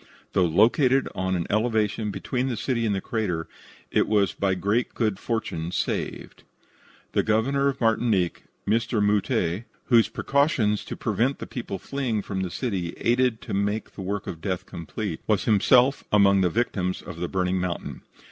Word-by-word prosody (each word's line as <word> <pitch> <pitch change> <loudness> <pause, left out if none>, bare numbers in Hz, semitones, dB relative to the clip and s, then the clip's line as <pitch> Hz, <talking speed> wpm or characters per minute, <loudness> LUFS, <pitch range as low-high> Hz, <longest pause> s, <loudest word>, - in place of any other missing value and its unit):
Though 90 - +4
located 125 - +4
on 95 0 -1
an 85 -2 -1
elevation 110 -1 +1
between 125 +5 -2
the 120 -4 -2
city 115 -4 0
and 100 - +1
the 95 - -2
crater, 100 -9 -2 0.4
it - - +2
was 105 -2 +2
by 95 -1 0
great 105 +6 0
good 110 -4 0
fortune 100 -8 -3
saved. - - -3 0.7
The - - +2
Governor 135 +6 +1
of 140 0 -1
Martinique, 110 -6 +1 0.2
Mr. 115 +2 +1
Mouttet, 105 -1 +1 0.2
whose 115 -3 +5
precautions 130 -8 +1
to - - -6
prevent 130 +5 0
the - - -6
people 115 -6 -5
fleeing 120 -2 -2
from 95 -2 -3
the 95 - -2
city 90 -5 -3
aided 120 -1 +1
to - - -6
make 100 +2 -1
the - - -8
work 100 +1 -3
of 80 - -6
death 95 0 -2
complete, 85 -4 -5
was - - +2
himself 125 +6 +4
among 100 -2 +5
the 90 - +3
victims 95 -3 -1
of 90 -2 -8
the 90 - -1
burning 95 0 0
mountain. 90 -2 -4
105 Hz, 165 wpm, -25 LUFS, 95-120 Hz, 0.7 s, whose